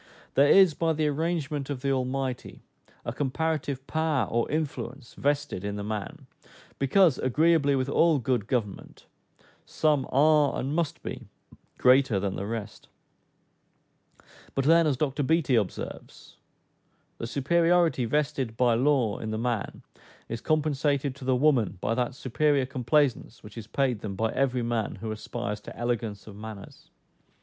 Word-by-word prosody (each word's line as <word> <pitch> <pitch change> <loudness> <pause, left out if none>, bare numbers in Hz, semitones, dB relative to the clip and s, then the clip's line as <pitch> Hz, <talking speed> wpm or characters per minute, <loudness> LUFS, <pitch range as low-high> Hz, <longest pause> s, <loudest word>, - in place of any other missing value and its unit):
There 140 +1 +4
is, 190 -4 +7
by 165 +2 0
the 155 0 0
arrangement 150 -2 -2
of 135 -3 -4
the 140 0 0
Almighty, 130 -1 -3 0.4
a 115 - -3
comparative 145 0 -2
power 155 - 0
or 115 +6 -1
influence 135 -4 -4
vested 145 -8 -1
in 100 0 -3
the 105 - -4
man, 110 +8 -5 0.5
because, 150 +2 +4
agreeably 145 +2 +3
with 130 0 0
all 160 +2 +3
good 125 -4 -1
government, 110 -6 -4 0.6
"Some 150 -4 0
are, 150 +1 +4
and 135 +3 -2
must 165 -2 -2
be, - - -7 0.5
greater 125 -4 +4
than 95 -1 -2
the 100 - -4
rest;" 110 -2 -6 1.7
but 135 - 0
then, 165 +1 +5
as 140 -4 +1
Dr 145 0 -1
Beattie 160 -1 +1
observes, 105 -6 -3 0.8
"the 115 - -4
superiority 165 +2 +2
vested 140 -3 -1
by 125 -2 +3
law 125 -3 +2
in 110 - -5
the 110 - -2
man 115 -2 -3 0.4
is 115 0 -5
compensated 145 -3 0
to 140 -2 -10
the 130 0 +2
woman 125 -7 +2
by 110 - -1
that 125 +1 -1
superior 140 +1 +1
complaisance 130 -1 0
which 105 -1 -12
is 115 -2 -8
paid 130 -3 0
them 100 -2 -5
by 110 +3 0
every 130 -3 0
man 115 -2 -2
who 110 +2 -5
aspires 105 -1 -5
to - - -11
elegance 115 -4 -3
of 105 - -11
manners." 105 -1 -10
130 Hz, 150 wpm, -27 LUFS, 115-150 Hz, 1.7 s, is